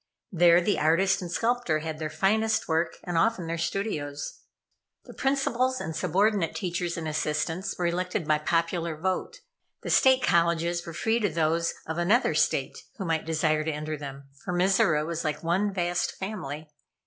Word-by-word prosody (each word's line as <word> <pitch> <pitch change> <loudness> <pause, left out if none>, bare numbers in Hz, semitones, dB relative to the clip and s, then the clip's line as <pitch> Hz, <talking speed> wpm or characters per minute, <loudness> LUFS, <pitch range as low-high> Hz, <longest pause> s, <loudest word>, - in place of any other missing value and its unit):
There 175 -1 +5
the 200 +4 +1
artist 190 +5 +3
and 175 -2 -6
sculptor 230 -5 +1
had 155 0 -5
their 155 -1 -3
finest 220 +5 +1
work, 160 0 0
and 175 -2 0
often 210 -2 +1
their 165 0 -3
studios. 150 -7 -3 0.7
The - - -11
principals 260 -2 0
and 160 0 -5
subordinate 190 +1 +1
teachers 175 -2 -2
and 160 -1 -4
assistants 155 +4 -2
were 180 - -1
elected 180 0 -1
by 155 0 +3
popular 165 0 -1
vote. 190 - -3 0.4
The - - -3
State 260 -1 +5
Colleges 170 -2 +2
were 165 - -6
free 225 +8 +1
to 205 -3 +1
those 165 +1 0
of 160 +1 -3
another 210 +9 +3
State - - 0 0.2
who 195 - -4
might 165 -2 -1
desire 155 -1 +1
to 160 - -1
enter 155 +1 -4
them, 140 -1 -8 0.2
for 180 - -3
Mizora 175 -4 +3
was 165 0 -3
like 155 0 -2
one 190 +5 +1
vast 175 -2 -1
family. 155 -7 -6
170 Hz, 170 wpm, -27 LUFS, 160-195 Hz, 0.7 s, There